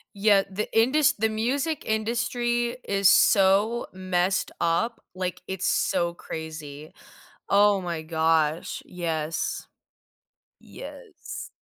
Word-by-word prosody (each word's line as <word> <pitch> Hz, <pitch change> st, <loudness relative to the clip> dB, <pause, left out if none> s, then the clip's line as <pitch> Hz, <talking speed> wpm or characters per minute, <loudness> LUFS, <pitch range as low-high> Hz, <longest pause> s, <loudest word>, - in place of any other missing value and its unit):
Yeah, 200 Hz, -1 st, +4 dB
the 210 Hz, +3 st, -3 dB
indus 265 Hz, +5 st, +4 dB
the 220 Hz, +1 st, 0 dB
music 265 Hz, +8 st, -1 dB
industry 240 Hz, +2 st, -1 dB
is 195 Hz, -1 st, +3 dB
so 205 Hz, +5 st, +4 dB
messed 185 Hz, 0 st, 0 dB
up, 220 Hz, +8 st, 0 dB
like, 185 Hz, -1 st, -4 dB
it's 190 Hz, -1 st, -3 dB
so 170 Hz, 0 st, +1 dB
crazy. 155 Hz, -3 st, -8 dB, 0.6 s
Oh 200 Hz, -1 st, +4 dB
my 170 Hz, -3 st, -4 dB
gosh. 160 Hz, -1 st, 0 dB
Yes. 165 Hz, -3 st, -3 dB, 0.9 s
Yes. 435 Hz, -8 st, -10 dB
195 Hz, 100 wpm, -25 LUFS, 170-230 Hz, 0.9 s, Yeah